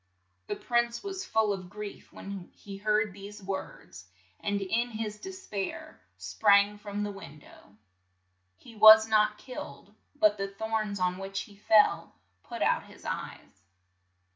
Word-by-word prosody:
' 95 +1 -45
The - - -2
prince 240 -1 0
was 385 -1 -5
full 220 -2 +2
of 185 -2 -7
grief 210 +1 -9
when 195 -2 -8
he 200 -1 -10
heard 210 0 +1
these 200 +1 -10
words, 190 - -7 0.3
and 205 0 -1
in 230 +5 -1
his 215 -2 -5
des 380 - -9
pair 195 -2 -5 0.2
sprang 200 - +3
from 205 0 -4
the 205 - -3
win 190 -7 -11
dow. 105 -7 -18 0.8
He 230 - -15
was 220 +1 +9
not 215 -1 +3
killed, 205 - -9 0.2
but 310 -8 +3
the 195 - -1
thorns 215 0 -3
on 180 0 0
which 195 0 -4
he 205 - -12
fell 210 - +3 0.3
put - - -5
out - - +1
his - - -16
eyes. - - -6
205 Hz, 155 wpm, -29 LUFS, 195-220 Hz, 0.8 s, was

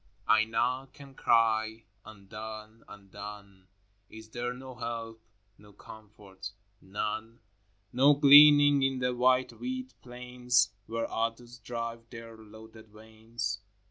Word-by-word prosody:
VIII. - - +4
I 110 - +3
knock 130 +4 -2
and 140 -1 -13
cry, 110 -2 +1
— - - -42
Undone, 110 +2 -10
undone! 100 -1 -12 0.4
Is 110 0 -13
there 120 +1 -3
no 130 +1 -10
help, 115 -2 -6 0.4
no 105 0 -18
comfort, 100 -2 -12 0.2
— 100 - -42
none? 110 +4 -5 0.5
No 140 +4 +5
gleaning 145 0 +7
in 135 0 +1
the 125 0 -1
wide 130 +1 +2
wheat 255 0 -6
plains 125 -2 -1
Where 115 +1 -3
others 120 +2 -4
drive 115 0 -6
their 115 -1 -10
loaded 110 0 -15
wains? 110 +2 -6
115 Hz, 125 wpm, -29 LUFS, 110-125 Hz, 0.5 s, gleaning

